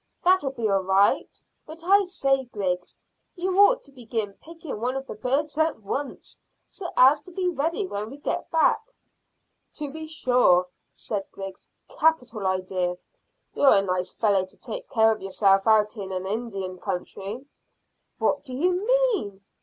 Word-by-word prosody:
"That'll 365 -6 +4
be 235 -5 -2
all 195 -1 +2
right. 190 +2 +2 0.3
But 320 +2 -10
I 395 +3 +5
say, 275 -7 0
Griggs, 185 -6 -3 0.4
you 370 0 -2
ought - - +6
to 280 - -13
begin 225 -5 -4
picking 320 -8 -8
one 250 +2 -1
of 270 0 -4
the - - -7
birds 295 +4 -1
at 315 -7 +1
once, 275 +7 -5 0.3
so 355 -3 -7
as 275 +3 +6
to 365 - -14
be 365 +1 -1
ready 335 +4 -1
when 210 - -4
we 275 - -10
get 290 - -3
back." 325 +6 +3 0.9
"To 295 -2 -5
be 315 +1 -7
sure," 250 - +3 0.3
said 200 -3 -5
Griggs; 195 -1 -9 0.2
"capital 250 - +1
idea. 185 -1 -1 0.6
You're 275 - +5
a 195 - +3
nice 180 -1 -2
fellow 200 -4 +2
to 185 - -13
take - - -7
care 225 -2 +4
of 215 - -3
yourself 195 +1 +2
out 215 0 +4
in 195 -3 -6
an 185 0 -3
Indian 195 -3 -4
country!" 200 +8 -5 0.7
"What - - 0
do 255 -3 -7
you 360 +6 +1
mean?" 460 - +1
250 Hz, 160 wpm, -25 LUFS, 195-320 Hz, 0.9 s, ought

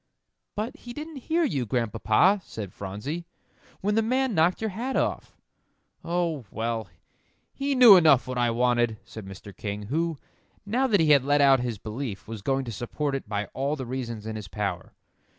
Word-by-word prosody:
"But 230 +8 -3
he 240 -5 -9
didn't 305 +2 -7
hear 335 +1 +2
you, 135 - -1
Grandpapa," 115 - +2
said 105 -4 -7
Phronsie, 105 - -5 0.5
"when 210 +2 +1
the 225 - +3
man 255 +2 +1
knocked 170 +1 +3
your 220 -1 -2
hat 245 +7 -3
off." - - -1 0.7
"Oh, 170 -6 -1
well, 115 -1 -3 0.7
he 275 0 -1
knew 245 -5 +10
enough 155 -7 +5
what 130 -1 -3
I 120 -1 +3
wanted," 120 -1 +1
said 110 -3 -9
Mr. 95 +1 -10
King, 105 0 -5
who, 165 0 0 0.5
now 250 +6 +1
that 205 -7 +3
he 155 -2 +4
had 140 -3 +6
let 145 +1 +2
out 135 -2 +6
his 120 -3 -3
belief, 110 -1 -6
was 110 -2 -6
going 135 +4 0
to 120 - -5
support 135 +6 -3
it 135 -6 -4
by 105 -1 -1
all 140 +3 -1
the 135 -3 -5
reasons 120 -4 -5
in 110 0 -4
his 105 -3 -6
power. 100 -3 -4
135 Hz, 185 wpm, -26 LUFS, -, 0.7 s, knew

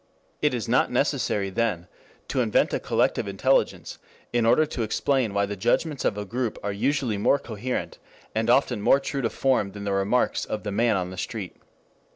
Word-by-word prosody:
It - - +2
is - - -3
not - - +2
necessary, 100 -2 0
then, 95 -5 -1 0.4
to 130 - +1
invent 110 -4 +2
a - - +1
collective - - 0
intelligence 100 +8 0 0.3
in 120 -1 +2
order 155 +7 +5
to 130 - -5
explain 120 +1 0
why 100 0 +1
the 105 +1 -5
judgments 145 - 0
of 100 - +1
a 105 - -4
group 120 +2 -3
are 100 - -1
usually 120 -1 0
more 140 - +4
coherent, 120 -1 -4 0.3
and 110 +1 0
often 125 -3 +3
more 135 - +5
true 140 0 -3
to 115 - 0
form 120 -8 0
than 100 -1 -7
the 100 -1 -1
remarks 100 +6 +1
of 105 - -4
the 105 - -3
man 110 +1 +2
in 90 -1 -3
the 95 - -9
street. 100 -3 -5
110 Hz, 190 wpm, -25 LUFS, 100-125 Hz, 0.4 s, order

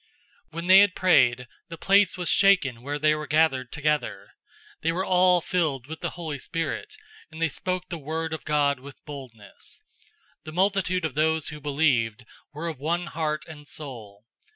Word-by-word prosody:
004:031 - - -36
When 170 +1 -4
they 190 +1 +8
had 200 -2 +4
prayed, 125 -9 +3 0.2
the 165 - -7
place 195 +2 +3
was 180 -1 -3
shaken 180 -12 +4
where 145 +3 -3
they 155 +1 +3
were 150 0 -4
gathered 150 -6 +2
together. 150 -9 -2 0.5
They 165 - +1
were 185 +3 -2
all 180 -1 +4
filled 160 -9 -1
with 160 +2 -8
the - - -1
Holy 155 -5 -4
Spirit, 165 +3 -4 0.3
and 160 0 -11
they 165 - +2
spoke 185 +4 -3
the 170 - -5
word 160 +2 -3
of 160 - -5
God 145 -2 +1
with 140 +1 -13
boldness. 125 -9 -8 0.6
004:032 - - -63
The 155 - -7
multitude 185 -1 +1
of 155 - -3
those 160 +1 +1
who 150 0 -9
believed 135 -6 +1 0.3
were 155 +3 -5
of 160 -6 -5
one 170 +5 -1
heart 155 -1 -2
and 150 -3 -11
soul. 115 -9 -8
155 Hz, 180 wpm, -26 LUFS, 140-170 Hz, 0.6 s, they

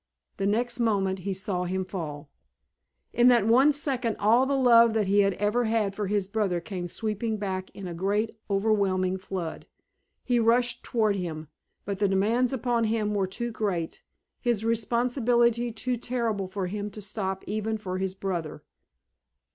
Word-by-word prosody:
The 195 - 0
next 240 +4 0
moment 195 -5 +1
he 195 +2 -3
saw 185 -1 -2
him 185 +1 -2
fall. 155 -6 -6 0.8
In 240 +1 +5
that 240 -4 +5
one 255 +6 +5
second 265 -6 -1
all 235 +6 +4
the 280 0 +1
love 235 -3 +6
that 215 -2 +2
he 200 +2 +3
had 195 -2 +3
ever 210 +4 +1
had 220 -3 +1
for 205 0 -3
his 200 -1 0
brother 200 -4 0
came 175 +1 -5
sweeping 220 +3 -2
back 190 -2 -3
in 195 - -7
a 175 - -5
great 205 +6 -1
overwhelming 195 -2 +1
flood. 185 -3 -5 0.6
He 245 -2 +2
rushed 240 +1 +2
toward 215 -4 +1
him, 160 -4 -5 0.4
but 200 -1 -3
the 205 - +3
demands 220 +6 +2
upon 240 -3 0
him 215 -1 0
were 195 -2 0
too 235 +5 -4
great, 190 -7 -3 0.4
his 235 -3 0
responsibility 235 +1 +2
too 245 +3 -2
terrible 230 -5 -2
for 190 0 -3
him 205 +3 -4
to 210 - -10
stop 195 -1 -3
even 215 +2 -2
for 185 -3 -4
his 190 0 -2
brother. 175 -5 -4
210 Hz, 165 wpm, -27 LUFS, 190-235 Hz, 0.8 s, love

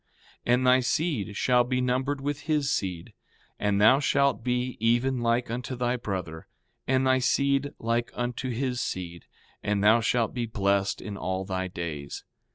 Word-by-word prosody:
And 125 +1 +3
thy 125 0 +6
seed 125 - -1
shall 125 -1 +3
be 125 +1 -1
numbered 130 +3 0
with 145 +1 -2
his 150 -3 +1
seed; 90 -4 -3 0.5
and 105 -1 +1
thou 110 +6 +6
shalt 140 -4 +2
be 125 +1 -1
even 120 +3 +1
like 120 0 +1
unto 125 +2 -4
thy 120 0 0
brother, 95 -8 -5 0.4
and 130 0 +2
thy 130 0 +4
seed 140 +2 +1
like 115 +1 -1
unto 120 +1 -3
his 125 0 -2
seed; 85 -6 -5 0.4
and 105 -1 0
thou 110 +3 +6
shalt 115 0 +1
be 120 -2 -2
blessed 100 -2 0
in 100 -2 -6
all 95 0 -3
thy 95 0 -2
days. 80 -5 -6
120 Hz, 165 wpm, -27 LUFS, 100-130 Hz, 0.5 s, thy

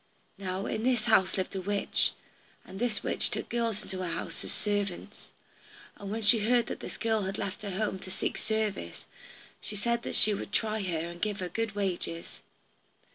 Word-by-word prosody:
Now 190 0 -3
in 220 - -2
this 245 -2 +2
house 190 -5 +4
there 190 - +1
lived 185 - -13
a - - -2
witch, 200 +2 +1 0.5
and 190 +1 -9
this 240 -2 0
witch - - 0
took - - -3
girls 230 -3 -1
into 190 - -5
her 185 - -2
house 165 - -3
as - - -4
servants. 205 -3 -2 0.7
And 200 - -7
when 220 +2 -2
she 215 +2 +8
heard 235 +2 +3
that - - -5
this - - -5
girl 225 -1 +1
had 195 0 -3
left 200 +3 -4
her 205 - -4
home 195 0 -1
to 185 - -9
seek - - -2
service, 215 - -2 0.6
she 210 - -5
said 235 +3 0
that - - +1
she 210 - +9
would 200 - -5
try 215 0 +1
her, 180 -4 -1
and 170 0 -9
give 210 -1 -1
her 180 -1 -3
good 225 +3 -2
wages. 180 -4 -2
205 Hz, 200 wpm, -30 LUFS, 190-220 Hz, 0.7 s, she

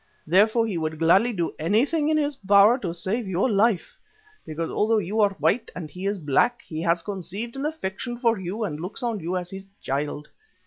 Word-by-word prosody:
Therefore 215 +7 +4
he 195 -7 -2
would 155 0 -3
gladly 185 +9 +4
do 175 -7 -2
anything 265 - +2
in 310 - +2
his 295 -1 0
power 205 +2 +5
to 180 -8 -3
save 190 +7 -2
your 190 +5 +1
life, 215 -3 +1 0.5
because 160 +1 -4
although 220 +2 +2
you 210 +2 0
are 200 -1 +3
white 230 - +1
and 160 -4 -7
he 185 +2 -5
is 200 +1 -1
black 165 - +1
he 155 0 -6
has 170 0 +1
conceived 205 +4 -5
an 275 +2 -2
affection 240 -5 -5
for 230 -3 +1
you 190 +5 -4
and 155 -7 -3
looks 185 +9 -5
on 230 -3 -1
you 180 +2 -2
as 180 -1 -6
his 195 0 -9
child. 145 +2 -3
200 Hz, 205 wpm, -24 LUFS, 170-230 Hz, 0.5 s, power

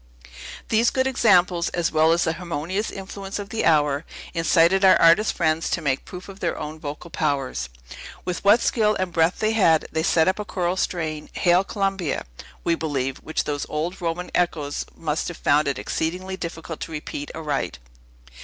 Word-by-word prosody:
These 230 +2 +4
good 260 0 0
examples, 185 -9 +3
as 170 -1 0
well 160 +1 +4
as 170 +1 +3
the 160 - 0
harmonious 180 +4 -3
influences 195 0 -6
of 200 -1 -6
the 225 - -1
hour, 150 -2 +3 0.3
incited 170 +3 +3
our 185 -3 +7
artist 170 +6 +5
friends 160 -1 0
to - - 0
make 135 -2 0
proof 180 0 -9
of 195 -1 -11
their 170 - -1
own 155 +1 -6
vocal 150 +3 -7
powers. 135 - -1 0.6
With 180 -1 -3
what 205 +4 +6
skill 215 -2 +2
and 185 -2 -2
breath 165 +1 +2
they 215 0 +1
had, 165 -8 +4
they 160 - 0
set 160 0 +3
up 190 +2 +1
a - - -1
choral 180 -3 -1
strain, 155 -5 -2
"Hail, 180 +1 +3
Columbia!" 195 -5 -2 0.4
we 170 - +2
believe, 140 -5 -2
which 160 - -2
those 145 -1 -3
old 165 +5 -3
Roman 170 +1 -3
echoes 150 -5 -1
must 155 -1 -2
have 175 - -6
found 145 +1 +2
it 140 -2 -1
exceeding 175 +7 -2
difficult 165 -2 -6
to - - -6
repeat 150 -1 -5
aright. 150 -4 -2
170 Hz, 180 wpm, -23 LUFS, 155-190 Hz, 0.6 s, our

